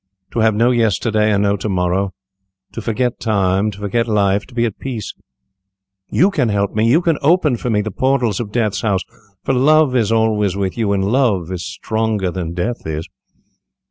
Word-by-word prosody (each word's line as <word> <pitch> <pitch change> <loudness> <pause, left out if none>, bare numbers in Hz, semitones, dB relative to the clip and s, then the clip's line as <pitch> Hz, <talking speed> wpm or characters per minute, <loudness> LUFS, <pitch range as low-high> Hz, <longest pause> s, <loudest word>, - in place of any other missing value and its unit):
To - - -2
have 110 -1 +3
no 120 +3 +3
yesterday, 110 -2 +1
and 100 0 +2
no 100 0 +2
to 105 - -4
morrow. 95 +1 0 0.6
To 115 - -6
forget 120 +2 -1
time, 100 -2 +1
to 100 - -9
forget 105 +4 -1
life, 100 -2 +1
to 125 - -16
be 120 -1 +2
at 110 - -4
peace. 120 -6 -5 1.0
You 190 +4 +3
can 135 - 0
help 100 -1 0
me. 110 +2 +2
You 155 +8 +4
can 165 -3 +1
open 155 -3 +3
for 120 - -4
me 105 -2 +2
the 110 +1 -4
portals 125 -3 0
of 110 -4 -5
death's 110 -4 0
house, 100 -4 0 0.4
for - - 0
love 145 +1 +4
is 115 -3 +2
always 110 -4 +1
with 95 -2 -2
you, 110 -4 0
and 95 -1 +1
love 105 -7 +1
is 90 -1 -4
stronger 105 0 -2
than 85 -2 -5
death 110 +2 -3
is." 80 0 -4
110 Hz, 195 wpm, -18 LUFS, 100-120 Hz, 1.0 s, You